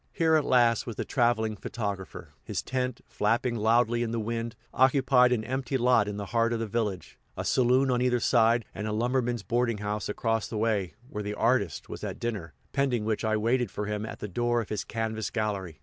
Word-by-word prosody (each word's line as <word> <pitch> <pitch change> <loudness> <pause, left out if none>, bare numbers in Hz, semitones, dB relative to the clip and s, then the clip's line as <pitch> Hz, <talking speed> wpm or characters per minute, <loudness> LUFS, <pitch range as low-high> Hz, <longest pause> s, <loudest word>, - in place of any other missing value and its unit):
Here 160 -1 +2
at 155 -2 +4
last 120 -2 +3
was 115 - -4
the - - -3
traveling 115 -3 +1
photographer. 100 -3 -5
His - - -3
tent, 125 -1 -2
flapping 115 +3 0
loudly 115 +2 +2
in 120 - -1
the 115 0 -2
wind, 115 +1 -3 0.2
occupied 130 -1 +4
an 115 -3 +1
empty 130 +2 -2
lot 125 -4 +3
in 105 0 -4
the 100 - -4
heart 115 0 +2
of 115 - -1
the 115 - -1
village 105 -4 -3 0.2
a - - -3
saloon 130 +1 +3
on 125 0 +1
either 125 -1 +2
side, 115 0 +3
and 105 - -4
a 105 - -2
lumberman's 120 0 0
boarding 120 +2 0
house 105 +1 -3
across 115 0 -1
the 110 - -5
way, 105 -6 0
where 105 -5 -5
the 105 0 -4
"artist" 105 - +1
was - - -8
at - - -5
dinner, 100 -10 -4 0.2
pending 130 -6 +1
which 110 0 -1
I 110 -1 +1
waited 120 +3 +1
for 105 - -4
him 105 0 -3
at 110 - -6
the - - -5
door 120 +4 0
of 115 - -4
his 105 - -2
canvas 110 -1 -3
gallery. 100 -8 -3
115 Hz, 210 wpm, -28 LUFS, 105-125 Hz, 0.2 s, at